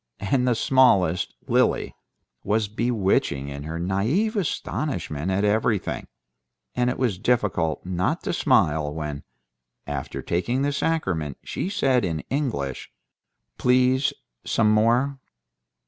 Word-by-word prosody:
And 125 +6 +1
the 120 - +3
smallest, 95 -9 +3
Lily, - - +2 0.5
was 105 +1 +1
bewitching 100 - 0
in 70 +1 -7
her 80 +2 -4
naïve 110 - 0
astonishment 140 - -2
at 95 +2 +1
everything, 105 0 0 0.7
and 125 0 +1
it 125 - -2
was 115 -8 0
difficult 100 -9 0
not 95 - -1
to - - -2
smile 80 - +2
when, 75 -2 -5 0.6
after 70 -2 -5
taking 120 +10 0
the 145 0 0
sacrament, 95 - -1
she 185 - -3
said 135 - +2
in 80 -4 -2
English, 115 - -2 0.7
"Please, 130 +2 +3 0.3
some 110 -2 +2
more." 120 +6 +2
105 Hz, 115 wpm, -24 LUFS, 85-130 Hz, 0.7 s, the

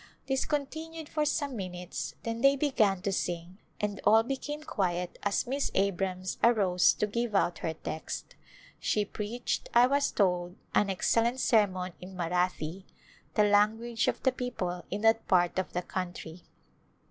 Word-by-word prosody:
This 265 -1 0
continued 315 +2 -4
for 305 0 0
some 285 -3 -1
minutes 180 -3 -5
then 230 0 -3
they 275 +1 +6
began 215 -10 +2
to 200 - 0
sing 175 0 -3 0.2
and 205 -1 -2
all 220 +1 +6
became 290 +4 -4
quiet 180 - -2
as 205 +4 0
Miss 275 +3 -1
Abrams 190 -1 -1
arose 195 -6 +4
to - - +1
give 230 +1 -2
out 175 -4 +2
her 160 -1 -3
text. 155 0 -6 0.5
She 210 -1 +1
preached, 215 +4 -3
I 240 +1 +8
was 280 +2 +2
told, 180 -3 +1 0.2
an 205 - +3
ex 190 - +1
cellent 235 +2 +2
sermon 190 -8 +2
in 185 +1 -9
Marathi^ 180 0 -1 0.5
the 210 - +5
language 215 +3 +2
of - - -1
the 260 - +4
people 185 -9 -3
in 200 +2 -3
that 225 0 +3
part 175 0 +3
of 190 - -3
the 180 - -1
country. 175 -2 -6
205 Hz, 160 wpm, -30 LUFS, 180-240 Hz, 0.5 s, I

